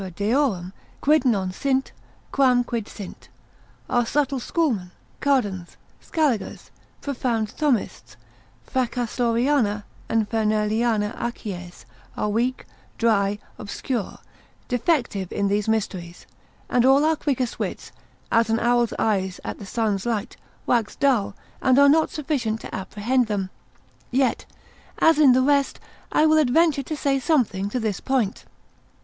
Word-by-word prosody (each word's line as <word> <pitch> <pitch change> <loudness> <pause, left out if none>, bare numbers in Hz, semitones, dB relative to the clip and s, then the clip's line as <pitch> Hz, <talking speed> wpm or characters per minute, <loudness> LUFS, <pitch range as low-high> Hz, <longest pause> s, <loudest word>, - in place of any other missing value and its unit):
deorum, 205 -4 0 0.3
quid 300 -1 +3
non 195 -7 +1
sint, 265 +6 -1 0.4
quam 255 -3 +4
quid 235 -3 -4
sint, 200 -4 -10 0.6
our 240 - +2
subtle 275 +2 0
schoolmen, 240 - -1 0.3
Cardans, 205 -11 0 0.2
Scaligers, 275 -11 -1 0.3
profound 240 -6 -1
Thomists, 280 -9 -1 0.5
Fracastoriana 240 -2 0 0.3
and 225 -2 +1
Ferneliana 215 0 +1
acies, 180 - -6 0.3
are 210 - 0
weak, 240 +4 -1 0.3
dry, 205 -3 +2 0.2
obscure, 215 +2 -4 0.5
defective 240 - 0
in 200 -1 0
these 205 +1 0
mysteries, 185 -6 -3 0.4
and 245 - +2
all 270 +3 +5
our 320 0 +3
quickest 265 -5 -2
wits, - - -4 0.4
as 230 -1 +3
an 225 0 +2
owl's 240 -1 +2
eyes 190 -3 0
at - - -5
the 200 - -9
sun's 215 -1 -1
light, 225 -4 -2 0.3
wax 230 -3 +1
dull, 245 -9 +1 0.3
and 260 0 +4
are 280 0 +7
not 315 +3 +4
sufficient 270 -8 -2
to - - -9
apprehend 220 +6 0
them; 195 -3 -2 0.6
yet, 260 +1 +1 0.5
as 325 -2 +4
in 280 -4 +7
the 255 +1 +3
rest, 280 0 +2 0.3
I 305 - +4
will 310 0 +5
adventure 305 +1 +3
to 300 +3 -5
say 275 -1 +1
something 240 - +1
to 250 - -2
this 215 -5 -2
point. 250 -7 -1
235 Hz, 130 wpm, -23 LUFS, 210-270 Hz, 0.6 s, are